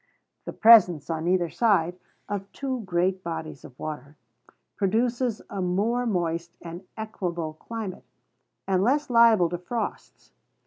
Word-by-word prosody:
The -, -, -5 dB
presence, 180 Hz, -10 st, +6 dB
on 160 Hz, +1 st, -2 dB
either 175 Hz, -2 st, +1 dB
side, 180 Hz, -4 st, +2 dB, 0.3 s
of 200 Hz, -1 st, -5 dB
two 265 Hz, -3 st, -3 dB
great 185 Hz, +1 st, 0 dB
bodies 160 Hz, -3 st, -6 dB
of 125 Hz, -, -13 dB
water, 150 Hz, -1 st, -7 dB, 0.6 s
produces 230 Hz, +3 st, 0 dB
a 195 Hz, -, -4 dB
more 215 Hz, +7 st, 0 dB
moist 170 Hz, -4 st, -2 dB
and 170 Hz, +2 st, -8 dB
equable 175 Hz, -7 st, -4 dB
climate, 215 Hz, +3 st, -7 dB, 0.6 s
and 190 Hz, -1 st, +2 dB
less 275 Hz, +4 st, +1 dB
liability 220 Hz, -8 st, +5 dB
to 175 Hz, -, -21 dB
frosts. 230 Hz, +4 st, -5 dB
185 Hz, 130 wpm, -26 LUFS, 170-225 Hz, 0.6 s, presence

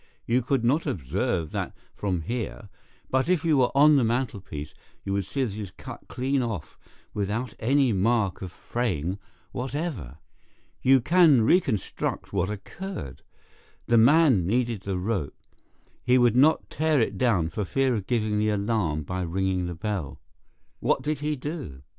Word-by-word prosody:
You 120 Hz, +2 st, +2 dB
could 130 Hz, 0 st, 0 dB
not 150 Hz, +7 st, +2 dB
observe 80 Hz, -, -1 dB
that -, -, -4 dB, 0.2 s
from 95 Hz, -4 st, -2 dB
here, 105 Hz, +1 st, -5 dB, 0.4 s
but 130 Hz, +5 st, +1 dB
if 180 Hz, -3 st, +2 dB
you 155 Hz, -3 st, +3 dB
were 125 Hz, -, +4 dB
on 150 Hz, +1 st, +7 dB
the 130 Hz, -, +3 dB
mantelpiece 105 Hz, -, -3 dB, 0.3 s
you 100 Hz, -, -2 dB
would 100 Hz, -1 st, -1 dB
see 135 Hz, +7 st, -2 dB
that 115 Hz, -6 st, -2 dB
it -, -, -6 dB
is 100 Hz, -, -6 dB
cut -, -, -11 dB
clean 130 Hz, +2 st, -1 dB
off 115 Hz, -9 st, -5 dB, 0.3 s
without 105 Hz, +4 st, -2 dB
any 130 Hz, +1 st, +3 dB
mark 100 Hz, 0 st, +1 dB
of 95 Hz, -2 st, -6 dB
fraying 95 Hz, -5 st, -2 dB, 0.3 s
whatever. 130 Hz, -, -4 dB, 0.6 s
You 135 Hz, 0 st, +5 dB
can 155 Hz, -4 st, +5 dB
reconstruct 115 Hz, -, 0 dB
what 95 Hz, -1 st, 0 dB
occurred. 105 Hz, -, -7 dB, 0.6 s
The 115 Hz, -1 st, +4 dB
man 130 Hz, -, +5 dB
needed 120 Hz, -1 st, 0 dB
the 100 Hz, -2 st, -3 dB
rope. 90 Hz, -, -2 dB, 0.7 s
He 125 Hz, +1 st, +4 dB
would 120 Hz, -2 st, +4 dB
not 145 Hz, +5 st, +4 dB
tear 155 Hz, -2 st, +2 dB
it 115 Hz, -, 0 dB
down 100 Hz, -10 st, +2 dB
for 105 Hz, +6 st, -3 dB
fear 135 Hz, +6 st, +1 dB
of 105 Hz, -5 st, -3 dB
giving 110 Hz, -3 st, 0 dB
the 110 Hz, 0 st, +2 dB
alarm 100 Hz, -7 st, 0 dB
by 90 Hz, +5 st, -4 dB
ringing 90 Hz, +1 st, -1 dB
the 90 Hz, -, -5 dB
bell. 95 Hz, -5 st, -4 dB, 0.6 s
What -, -, +1 dB
did 150 Hz, -1 st, -1 dB
he 150 Hz, +1 st, -1 dB
do? 135 Hz, -, -6 dB
115 Hz, 160 wpm, -26 LUFS, 95-135 Hz, 0.7 s, on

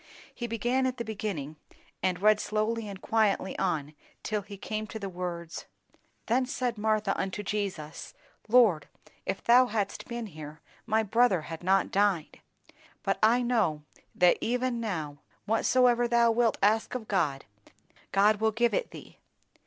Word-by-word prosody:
He 240 Hz, -, -5 dB
began 240 Hz, +3 st, 0 dB
at 255 Hz, 0 st, -3 dB
the 235 Hz, -, -4 dB
beginning 190 Hz, -9 st, -4 dB, 0.4 s
and 185 Hz, 0 st, -1 dB
read 215 Hz, 0 st, +5 dB
slowly 215 Hz, +1 st, -1 dB
and 195 Hz, -2 st, -7 dB
quietly 210 Hz, -4 st, +1 dB
on 155 Hz, -5 st, -1 dB, 0.3 s
till 210 Hz, -1 st, -1 dB
he 200 Hz, 0 st, -10 dB
came 215 Hz, +2 st, -4 dB
to 220 Hz, -, -7 dB
the 200 Hz, -2 st, -5 dB
words, 175 Hz, -2 st, -6 dB, 0.6 s
'"Then 250 Hz, +3 st, +1 dB
said 250 Hz, -2 st, -2 dB
Martha 215 Hz, -2 st, 0 dB
unto 195 Hz, +2 st, -3 dB
Jesus, 195 Hz, -7 st, -4 dB, 0.3 s
Lord, 215 Hz, -11 st, +4 dB, 0.4 s
if -, -, -3 dB
thou 250 Hz, +2 st, +6 dB
hadst 210 Hz, -3 st, -3 dB
been 235 Hz, -1 st, -4 dB
here, 155 Hz, -5 st, -10 dB, 0.3 s
my 220 Hz, +1 st, +2 dB
brother 220 Hz, -4 st, +3 dB
had 160 Hz, +1 st, -8 dB
not 190 Hz, +2 st, +2 dB
died. 195 Hz, -5 st, 0 dB, 0.6 s
But -, -, 0 dB
I 235 Hz, +3 st, +4 dB
know, 205 Hz, -12 st, +1 dB, 0.3 s
that 180 Hz, -1 st, +4 dB
even 250 Hz, 0 st, -1 dB
now, 160 Hz, -10 st, -4 dB, 0.3 s
whatsoever 240 Hz, +2 st, +3 dB
thou 235 Hz, -1 st, +4 dB
wilt 230 Hz, -1 st, +2 dB
ask 220 Hz, +4 st, +2 dB
of 230 Hz, -4 st, -5 dB
God, 150 Hz, -9 st, 0 dB, 0.7 s
God 205 Hz, +2 st, +4 dB
will 220 Hz, +1 st, +1 dB
give 235 Hz, +2 st, +1 dB
it -, -, -1 dB
thee. -, -, -13 dB
215 Hz, 155 wpm, -28 LUFS, 185-235 Hz, 0.7 s, thou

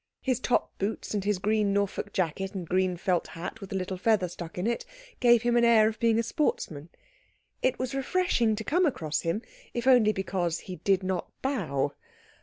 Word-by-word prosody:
His 255 Hz, -3 st, 0 dB
top 250 Hz, -, 0 dB
boots 205 Hz, +3 st, -3 dB
and 205 Hz, -2 st, -1 dB
his 205 Hz, -1 st, +1 dB
green 210 Hz, +1 st, +1 dB
Norfolk 200 Hz, -1 st, -1 dB
jacket 190 Hz, +3 st, -2 dB
and 180 Hz, -3 st, -4 dB
green 185 Hz, 0 st, +1 dB
felt 180 Hz, 0 st, 0 dB
hat 185 Hz, +6 st, -7 dB
with 195 Hz, -, -9 dB
a -, -, -2 dB
little 185 Hz, 0 st, -2 dB
feather 210 Hz, -2 st, +2 dB
stuck 170 Hz, -1 st, -8 dB
in 180 Hz, -, -2 dB
it 235 Hz, +1 st, 0 dB, 0.4 s
gave 240 Hz, -2 st, +5 dB
him 240 Hz, 0 st, +2 dB
an 240 Hz, -, +4 dB
air 225 Hz, -2 st, +6 dB
of 220 Hz, 0 st, -3 dB
being 230 Hz, -1 st, +3 dB
a 230 Hz, -, +2 dB
sportsman. 170 Hz, -, -2 dB, 0.7 s
It 255 Hz, -, +1 dB
was 255 Hz, 0 st, -3 dB
refreshing 270 Hz, -5 st, +1 dB
to 220 Hz, -, -5 dB
come 345 Hz, +8 st, +2 dB
across 155 Hz, -, -2 dB
him, 170 Hz, +8 st, -1 dB, 0.3 s
if 240 Hz, 0 st, -2 dB
only 245 Hz, -5 st, +6 dB
because 185 Hz, -4 st, -2 dB
he 185 Hz, -2 st, -8 dB
did 195 Hz, -1 st, +1 dB
not 185 Hz, -2 st, -2 dB
bow. 155 Hz, -, -1 dB
200 Hz, 200 wpm, -28 LUFS, 180-235 Hz, 0.7 s, air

